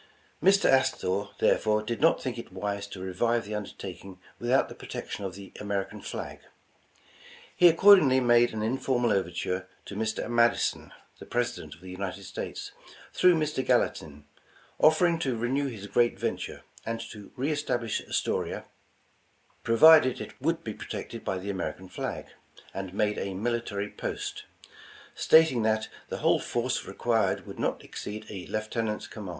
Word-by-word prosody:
Mr. 195 +4 +5
Astor, 100 -7 +2
therefore, 105 0 +2
did 115 +1 -4
not 165 +2 +5
think 125 -3 -4
it 115 - -9
wise 100 +1 -3
to 100 - -9
revive 115 +5 0
the 105 - -6
undertaking 95 -2 -7 0.2
without 125 +3 +2
the - - -9
protection 100 - -6
of 95 -1 -5
the 100 -1 -10
American 100 -1 -3
flag. - - -6 1.2
He 180 - +7
accordingly 170 -6 +7
''made 120 -1 +4
an 110 -1 -3
informal 120 0 +1
overture 95 -1 -1 0.2
to - - -8
Mr. 110 +1 -2
Madison, 120 0 +2 0.3
the - - -11
President 120 -11 -2
of 85 - -22
the 95 0 -9
United 95 +1 -5
States, - - -6 0.4
through 180 -1 +5
Mr. 155 -4 -1
Gallatin, 75 - 0 0.5
offering 165 +2 +4
to 130 -7 -1
renew 130 +5 0
his 110 -6 -7
great 120 +3 +2
ven - - -1
ture - - -7 0.2
and 115 0 -3
to 105 -2 -11
re 135 +5 -1
establish 120 -7 -1
Astoria, - - -2 1.0
provided 130 +2 +6
it - - -7
would 165 +3 0
be 110 - -4
protected - - -7
by 95 - -2
the 100 +2 -4
American 95 0 -4
flag, - - -4 0.5
and 95 -1 -5
made 105 +2 0
a 95 -1 -3
military 105 -1 -2
post; - - -5 0.7
stating 160 -7 +5
that 110 0 +1 0.2
the - - -3
whole - - +5
force - - -2
required - - 0
would - - -10
not - - -1
exceed 105 +1 -7
a 95 -3 -7
Lieutenant's 110 0 -2
command." 105 -4 -8
110 Hz, 155 wpm, -28 LUFS, 100-130 Hz, 1.2 s, He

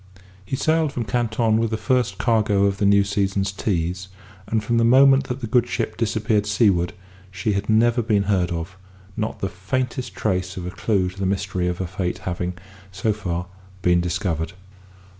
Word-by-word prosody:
He 95 - -3
sailed 155 +1 +1
from 120 -4 -3
Canton 110 0 +1
with 115 0 +1
the 110 - -1
first 115 -4 0
cargo 105 -4 +2
of 100 0 +1
the 100 - +3
new 100 0 +5
season's 100 -1 0
teas, 90 -2 -2 0.4
and 110 0 0
from 115 +2 0
the - - +3
moment 135 +3 +6
that 125 +2 -5
the - - -2
good 120 +2 +2
ship 120 - -2
disappeared 110 -2 0
seaward 100 -4 +2 0.4
she 95 +2 -2
had 100 +2 -2
never 115 +2 +4
been 105 -3 +1
heard 95 -3 +1
of; 85 +1 -5 0.4
not 110 0 -3
the 95 - 0
faintest 125 +7 -3
trace 95 -3 -1
of 90 - -5
a 90 - -4
clue 95 -2 0
to 95 +2 -12
the 95 - 0
mystery 95 -2 -1
of 90 0 -1
her 95 - -2
fate 90 0 -3
having, 90 0 -4 0.3
so 100 +3 0
far, 90 -4 -3 0.4
been 90 -1 +4
discovered. 85 -1 -2
100 Hz, 185 wpm, -22 LUFS, 95-115 Hz, 0.4 s, moment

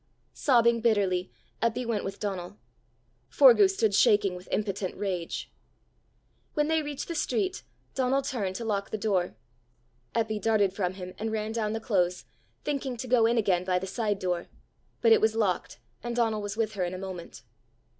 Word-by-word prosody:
Sobbing 235 -3 +3
bitterly, 195 -5 +1 0.3
Eppy 230 +2 0
went 225 -3 -1
with 195 +1 -5
Donal. 195 -1 -4 0.7
Forgue 465 -6 +7
stood 225 - +1
shaking 205 -3 +4
with 180 0 -10
impotent 200 -3 -2
rage. 185 -4 -3 1.0
When 300 0 +1
they 320 0 +2
reached 290 -2 -5
the 335 - -3
street, 375 +4 -1 0.3
Donal 265 +1 +1
turned 210 -9 -2
to 230 - -4
lock 200 -2 -1
the - - -3
door. 195 -4 0 0.8
Eppy 220 -2 0
darted 210 -4 +2
from 185 -3 -1
him, 185 -1 -7
and 220 +1 -2
ran 215 0 -2
down 220 -2 -1
the 225 - -2
close, 180 -6 0 0.4
thinking 275 -4 -2
to 255 +2 -5
go 235 -2 +4
in 235 +1 +2
again 190 -5 +2
by 185 -1 +1
the 185 - -3
side 205 +1 -1
door. 180 -2 -2 0.5
But 230 - +5
it 225 - +7
was 220 0 +3
locked, 205 -5 0 0.2
and 240 0 -4
Donal 225 -3 +1
was 205 +1 -5
with 220 -1 0
her 195 -3 -1
in 175 +1 -2
a - - -5
moment. 185 -2 -8
215 Hz, 175 wpm, -28 LUFS, 190-235 Hz, 1.0 s, Forgue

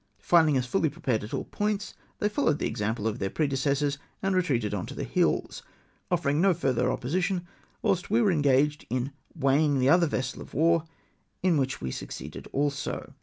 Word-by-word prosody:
Finding 160 -5 +5
us 125 - 0
fully 160 +4 +1
prepared 120 -6 -1
at 105 - -7
all - - -2
points, 205 -1 -2 0.2
they 210 - +1
followed 210 - +1
the - - -2
example 105 +1 -1
of 110 - -2
their 95 - -1
predecessors, 140 0 0 0.2
and 195 -1 +1
retreated 130 - +1 0.2
to - - -8
the - - -3
hills, - - 0 0.5
offering 160 -4 +1
no 190 -2 +4
further 130 -5 +1
opposition, 180 +6 -1 0.4
whilst 180 -2 +1
we 225 +3 +3
were 210 -4 +4
engaged 145 -1 +2
in 125 +3 -1 0.2
weighing 145 0 +3
the 130 +1 +3
other 170 +2 +5
vessel 130 -3 -3
of - - -11
war, 165 +1 +3 0.6
in 185 -3 +4
wliich 135 -2 -1
we 65 - -3
succeeded - - -7
also. 145 0 -2
145 Hz, 175 wpm, -27 LUFS, 130-175 Hz, 0.6 s, Finding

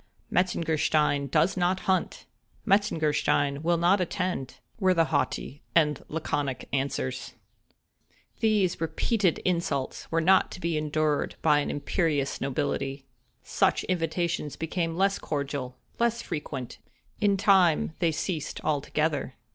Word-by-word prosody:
—"Metzengerstein 155 -5 +1
does 185 +8 +2
not 185 +1 +1
hunt;" 190 -1 -1 0.4
"Metzengerstein 150 -8 +2
will 170 +1 +2
not 180 +4 +3
attend," 180 -6 -2 0.2
were 185 -2 +3
the 165 -1 +4
haughty 145 0 -1
and 150 -3 +3
laconic 145 -4 -2
answers. 135 - -2 1.1
These 205 -6 +2
repeated 175 +4 +1
insults 170 -7 -1
were 165 - +2
not 185 +4 +4
to - - -8
be 170 -2 -1
endured 150 0 0
by 150 -2 +5
an 145 - -2
imperious 145 -1 -1
nobility. 135 0 -2 0.4
Such - - +1
invitations 170 -3 -1
became 165 0 -2
less 195 +1 +2
cordial—less 145 - -3
frequent—in 150 - -4
time 185 -5 +4
they 170 -2 +2
ceased 160 0 -3
altogether. 150 -2 -1
160 Hz, 110 wpm, -27 LUFS, 145-180 Hz, 1.1 s, by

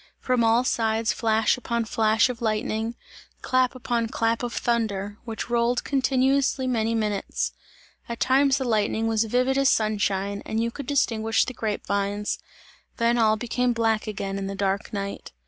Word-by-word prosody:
From 250 -2 +1
all 230 +2 +4
sides 225 -2 +1
flash 220 0 +2
upon 235 -1 -2
flash 220 +1 +3
of 245 -2 -6
lightning, 220 +1 -1 0.5
clap 255 0 +2
upon 235 -2 -1
clap 230 -1 0
of 245 -1 -3
thunder, 210 -4 -1
which 225 0 -5
rolled 240 +1 +1
continuously 270 0 +1
many 230 -3 0
minutes. 210 -3 -1 0.6
At 235 - -5
times 270 +1 +3
the 270 - -2
lightning 220 -1 0
was 225 0 +1
vivid 255 +4 +1
as 275 0 +4
sunshine, 200 -2 0
and 220 - -2
you 230 +1 0
could 280 +2 -8
distinguish 225 -6 +1
the 255 - -5
grape 215 -3 -3
vines; 200 +1 -1 0.6
then 235 +1 +2
all 220 -1 +4
became 245 +2 0
black 225 -2 0
again 195 -2 -3
in 195 - -3
the 195 - -4
dark 195 +1 -1
night. 200 - -5
225 Hz, 165 wpm, -25 LUFS, 215-245 Hz, 0.6 s, all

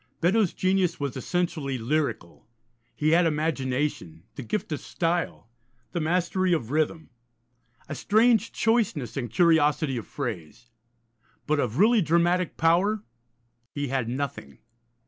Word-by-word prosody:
Beddoes' 190 +2 +2
genius 185 -2 +1
was 140 -2 -3
essentially 150 -2 -2
lyrical: 125 - -2 0.5
he 150 - +1
had 170 +1 +4
imagination, 140 - -2
the - - -7
gift 160 - -3
of 150 - -2
style, 170 -6 -2 0.4
the 175 - -2
mastery 180 +3 +1
of 125 -7 -2
rhythm, 155 +1 -1 0.8
a - - -5
strange 225 +1 +3
choiceness 220 - 0
and 125 -4 -3
curiosity 150 0 +3
of 115 - -6
phrase. 115 - -6 0.7
But 155 -1 +1
of 115 -2 -1
really 220 +4 +5
dramatic 170 +1 +1
power 180 +6 +2 0.7
he 145 -2 -3
had 130 -3 -1
nothing. 130 - -5
155 Hz, 125 wpm, -26 LUFS, 135-180 Hz, 0.8 s, really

